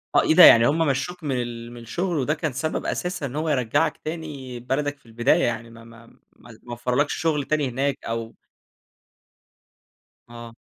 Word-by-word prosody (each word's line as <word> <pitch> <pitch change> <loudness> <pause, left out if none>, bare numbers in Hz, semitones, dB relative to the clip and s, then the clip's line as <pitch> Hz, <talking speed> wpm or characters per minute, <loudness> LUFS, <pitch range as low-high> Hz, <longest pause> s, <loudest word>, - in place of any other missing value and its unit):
آه - - +7
إيه - - +2
ده - - +9
يعني 115 0 +9
هُم 150 +3 +1
مشّوك 155 +6 -2
من 130 -4 -1
ال 120 0 -7
من 120 -1 -10
الشغل، 175 +8 -2
وده 145 +3 0
كان 155 -4 -3
سبب 155 +4 -3
أساسًا 180 -5 -3
إن 135 +1 -6
هو 155 +1 -1
يرجّعك 140 +3 +1
تاني 150 -6 -7
بلدك 145 +3 -2
في - - -34
البداية 120 +9 +1
يعني، 115 -1 -2
ما 115 0 -14
ما 115 0 -15
ما - - -22 0.5
ما 120 - -8
وفّروا 125 +4 +1
لكش 145 - -5
شغل 155 -3 0
تاني 150 -3 0
هناك، 135 +3 -1
أو 115 0 -4 1.9
آه. 115 -1 -11
135 Hz, 185 wpm, -23 LUFS, 120-155 Hz, 1.9 s, ده